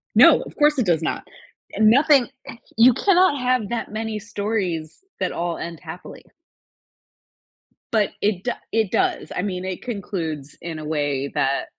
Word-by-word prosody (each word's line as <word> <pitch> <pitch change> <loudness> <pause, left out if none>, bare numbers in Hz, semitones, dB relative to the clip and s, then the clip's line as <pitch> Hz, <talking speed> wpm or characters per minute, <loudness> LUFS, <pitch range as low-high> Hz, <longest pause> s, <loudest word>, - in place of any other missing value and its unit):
No, - - +7
of - - -10
course 295 -1 +4
it 250 - +1
does 170 -4 +2
not. 160 - -3 0.5
Nothing 255 +4 +5 0.5
you 240 +3 +7
cannot 365 - +3
have 250 -4 0
that 235 -1 -3
many 220 0 -3
stories 200 -6 -3 0.2
that 185 - -1
all 170 0 -3
end 170 -2 -6
happily. - - -10 1.7
But 215 -3 +2
it 200 -3 0
do 245 - 0 0.2
it 220 -4 +1
does. - - 0
I - - -1
mean, 185 -2 -3
it 185 -1 -4
concludes 170 - -5
in 165 -2 -6
a 155 - -7
way 145 -3 -1
that 135 +1 +1
200 Hz, 155 wpm, -22 LUFS, 165-235 Hz, 1.7 s, No